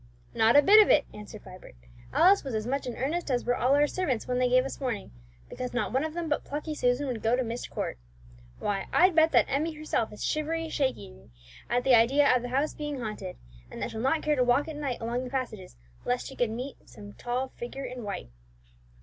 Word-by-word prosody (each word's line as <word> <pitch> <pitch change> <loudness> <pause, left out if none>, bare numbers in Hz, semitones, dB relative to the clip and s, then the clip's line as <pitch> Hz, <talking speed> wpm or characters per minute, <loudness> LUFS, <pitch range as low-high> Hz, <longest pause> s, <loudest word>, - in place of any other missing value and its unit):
"Not 225 +3 +4
a 290 - +8
bit 425 +7 +8
of 420 - +3
it," - - +5
answered 210 0 -10
Vibert; 185 - -13 0.4
"Alice 385 +4 +5
was 265 -5 -4
as 215 0 -2
much 270 +2 -2
in 245 - -4
earnest 310 +5 -2
as 245 -2 0
were 245 - +2
all 255 +4 +3
our 290 +1 +4
servants 295 -7 -2
when 250 0 0
they 250 0 +2
gave 255 +1 +4
us 270 - -6
warning, 250 - -3 0.4
because 250 -1 -6
not 245 - -1
one 265 +2 +2
of 315 0 -4
them 345 -1 -3
but 295 - -1
plucky 300 +2 -4
Susan 250 0 +1
would 245 -5 -3
go 225 +2 +2
to 255 - 0
Myst 235 +1 -5
Court. - - -4 0.6
Why, 200 -2 -2
I'd 365 +1 +5
bet 320 0 +4
that - - +5
Emmie 300 +4 -1
herself 305 -7 -2
is 210 - -8
shivery 320 +1 -1
shakery 65 - -3 0.4
at 245 +1 +1
the 265 - +4
idea 255 +4 +5
of 250 - +1
the 245 - -5
house 275 +4 0
being 295 -2 -5
haunted, 210 -5 -6 0.3
and - - -9
that - - -3
she'll 220 0 -5
not 270 +5 +1
care 300 0 +2
to 255 - +2
walk 245 +5 +2
at 315 - -6
night 280 -4 -3
along 235 +2 -2
the 255 - -6
passages 245 -8 -5 0.3
lest 245 0 -1
she 270 - -8
should 245 -3 +1
meet 250 +5 -7
some 105 -4 -12
tall 245 - -3
figure 260 +3 -7
in 250 -1 -6
white." 200 - -6
255 Hz, 235 wpm, -28 LUFS, 235-295 Hz, 0.6 s, a